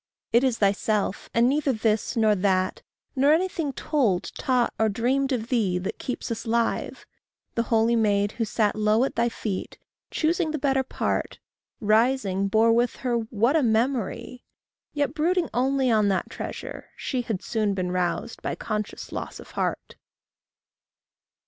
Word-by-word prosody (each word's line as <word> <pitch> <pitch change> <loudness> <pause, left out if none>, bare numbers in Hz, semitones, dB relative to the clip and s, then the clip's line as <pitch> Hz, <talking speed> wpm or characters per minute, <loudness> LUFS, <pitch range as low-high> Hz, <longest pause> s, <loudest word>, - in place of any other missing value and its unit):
It 235 +2 +5
is 255 -3 +2
thyself, 205 0 0
and 235 +1 +3
neither 285 +1 +2
this 220 +1 0
nor 220 -1 +4
that, 185 -1 +1 0.3
Nor 280 +3 +5
anything, 330 -3 0
told, 245 - 0
taught, 250 -2 +1
or 220 0 +3
dreamed 260 +6 0
of 235 -3 -2
thee, 210 -8 +1
That 185 +2 -4
keeps 250 - -4
us 230 +1 -4
live. 230 0 -1 0.5
The 230 - +1
holy 230 +1 +3
maid 205 -2 +2
who 225 - -2
sat 210 -1 +1
Low 215 +2 +3
at 270 - -1
thy 235 +1 +2
feet, 210 -4 -5 0.3
choosing 330 +1 0
the 310 - -2
better 270 -2 +2
part, 265 - -2 0.4
Rising, 215 -3 +2
bore 225 +3 +4
with 240 +1 +2
her 245 -1 +1
what 230 +3 +1
a 320 - +4
memory! 235 0 -1 0.5
Yet, 285 -2 -1
brooding 340 +2 +1
only 260 0 +2
on 215 -2 +3
that 195 -2 0
treasure, - - -7
she 255 -3 -2
Had 220 -5 -4
soon 215 -3 0
been 180 -1 -2
roused 180 +5 -2
by - - -3
conscious 210 -1 -4
loss - - -5
of - - -12
heart. - - -3
230 Hz, 155 wpm, -25 LUFS, 210-265 Hz, 0.5 s, It